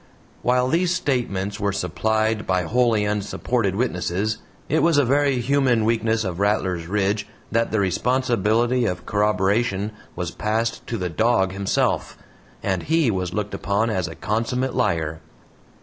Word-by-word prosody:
While 125 +1 +2
these 170 +5 +2
statements 105 - -1
were 100 0 0
supplied 110 +4 0
by 90 -1 +1
wholly 115 +2 +2
unsupported 105 0 -1
witnesses, 105 -1 -1 0.3
it 160 - +2
was 165 -3 +3
a 145 - +4
very 140 0 +2
human 125 -3 +2
weakness 115 0 +1
of 90 -3 -4
Rattlers 95 -5 0
Ridge 100 +2 0 0.2
that 115 0 +1
the 110 - +1
responsibility 120 +3 +1
of 90 -2 -4
corroboration 105 0 +1 0.2
was 90 -1 -3
passed 110 +2 -2
to 115 - -2
the 90 -3 -2
dog 95 +1 +2
himself, 100 0 0 0.5
and 95 -2 0
HE 160 -5 +2
was 90 -3 -2
looked 105 -1 -2
upon 105 +3 0
as 95 -4 -1
a 80 - -8
consummate 125 +4 -1
liar. 80 -1 0
110 Hz, 145 wpm, -23 LUFS, 95-120 Hz, 0.5 s, a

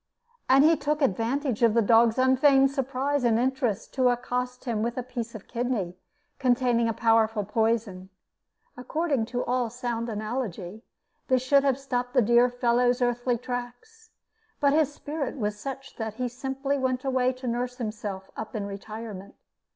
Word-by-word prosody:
And 270 +2 +6
he 325 +2 +6
took 300 0 -1
advantage 245 +3 0
of 230 -2 +4
the 230 - +5
dog's 230 +2 +4
unfeigned 270 +1 +4
surprise 275 +1 -1
and 230 -2 +3
interest 245 -4 -1
to 255 -2 +3
accost 250 +1 -2
him 230 -4 -1
with 235 +2 -2
a 250 - -2
piece 235 -2 -6
of 210 - -10
kidney 235 -7 -2 0.4
containing 245 -2 +2
a - - +2
powerful 225 -1 +2
poison. 210 -3 -1 0.7
According 275 -2 -1
to 245 +1 -3
all 245 -1 0
sound 240 0 -3
analogy, 215 -3 -4 0.5
this 255 -1 +2
should 275 +1 +4
have 270 -2 +2
stopped 250 -2 -3
the 255 - +6
dear 240 +3 +5
fellow's 245 0 +2
earthly 245 0 0
tracks; 245 - -7 0.5
but 280 -1 +3
his 305 -2 +3
spirit 290 -1 -5
was 210 -3 -2
such 270 +2 -7
that 220 -2 -4
he 250 +2 -2
simply 270 +3 -3
went 255 0 -1
away 255 -1 +2
to 255 +1 -10
nurse 245 +1 -2
himself 210 -5 -5
up 220 +1 -7
in 205 -2 -2
retirement. 200 0 -8
245 Hz, 160 wpm, -26 LUFS, 225-260 Hz, 0.7 s, And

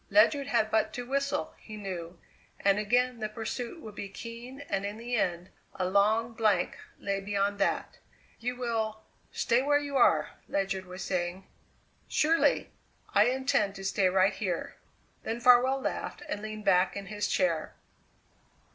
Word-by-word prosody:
Ledyard 230 +8 +4
had 220 -5 +1
but 220 0 +2
to 245 - -4
whistle, 280 +2 -1
he 215 -1 -9
knew, 180 -4 -6 0.4
and 195 +1 +3
again 245 +3 +1
the 215 -1 -2
pursuit 235 +7 -5
would 215 - -9
be 200 -1 -6
keen, 235 +6 -8
and 195 -9 -2
in 205 +1 -4
the 240 +2 -3
end 180 -4 -1 0.2
a 185 - -1
long 215 +4 +3
blank 215 -5 +2 0.2
lay 200 0 -2
beyond 200 0 -1
that! 195 - 0 0.4
"You 245 +2 -2
will 225 -3 -2 0.3
stay 235 +2 +2
where 290 +2 +3
you 285 -1 -2
are!" 155 -11 +4 0.2
Ledyard 195 -1 -1
was 180 +1 -7
saying. 180 +1 -2 0.6
"Surely. 325 +2 +2 0.4
I 205 +1 +6
intend 245 -5 +1
to 195 -1 -7
stay 190 -1 +2
right 190 +2 +3
here." 180 -5 -3 0.5
Then 230 +1 -3
Farwell 250 +2 +6
laughed - - -4
and 205 - -3
leaned 215 0 -6
back 190 0 +3
in 200 - -5
his 210 0 -2
chair. 165 -4 0
215 Hz, 155 wpm, -29 LUFS, 195-245 Hz, 0.6 s, I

